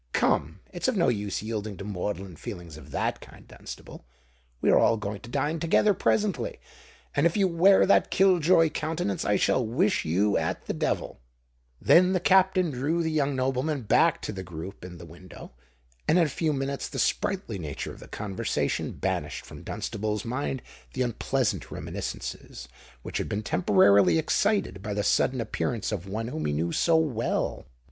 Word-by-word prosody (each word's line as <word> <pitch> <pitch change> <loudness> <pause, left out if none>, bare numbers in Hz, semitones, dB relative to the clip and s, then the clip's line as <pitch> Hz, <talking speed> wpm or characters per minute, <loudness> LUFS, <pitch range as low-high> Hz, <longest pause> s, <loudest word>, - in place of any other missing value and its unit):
"Come—it's 95 - -1
of 255 -5 +1
no 170 - +3
use 105 -3 -2
yielding 110 -2 -4
to 100 - -7
maudlin 95 -2 -4
feelings 85 -1 -8
of 75 -3 -12
that - - -2
kind, - - -15
Dunstable. - - -10 0.6
We - - +3
are - - +6
all 115 - +4
going 105 -1 -5
to 115 - -12
dine 145 +5 -1
together 175 +5 +3
presently: 205 0 0 0.6
and 145 +4 +4
if 170 - -2
you 195 -2 +4
wear 185 +3 +5
that 200 - +4
kill 190 -2 +4
joy 165 -1 +4
countenance, 155 -11 -2
I 105 - +2
shall 130 - +2
wish 165 - +1
you 95 +6 +2
at - - -3
the - - -2
devil." - - -2 0.6
Then 180 +2 +5
the 185 - +2
Captain 185 -1 +3
drew 145 +7 -1
the 160 - -1
young 145 -3 +1
nobleman 130 +2 -1
back 105 - +3
to - - -3
the 95 -2 -6
group 90 +1 -8
in 90 -1 -9
the - - -10
window; - - -12 0.6
and 160 - +4
in 175 - +5
a - - -2
few 155 +3 -1
minutes 140 -1 -3
the - - -7
sprightly 180 - -1
nature 75 -5 -5
of - - -14
the - - -12
conversation 100 -3 -2
banished - - -3
from - - -11
Dunstable's 105 0 -3
mind 130 +2 -3 0.3
the 130 - 0
unpleasant 125 +1 -1
reminiscences - - -6 0.4
which - - -4
had - - -3
been 105 +2 -2
temporarily 100 - +4
excited 160 - +1
by 105 0 -4
the 105 - 0
sudden 130 +4 +2
appearance 115 0 -2
of 100 -3 -4
one 110 +4 -3
whom 80 -9 -4
he 75 - -1
knew 80 +3 -1
so 165 -1 +3
well! 130 - -1
125 Hz, 180 wpm, -27 LUFS, 100-165 Hz, 0.6 s, are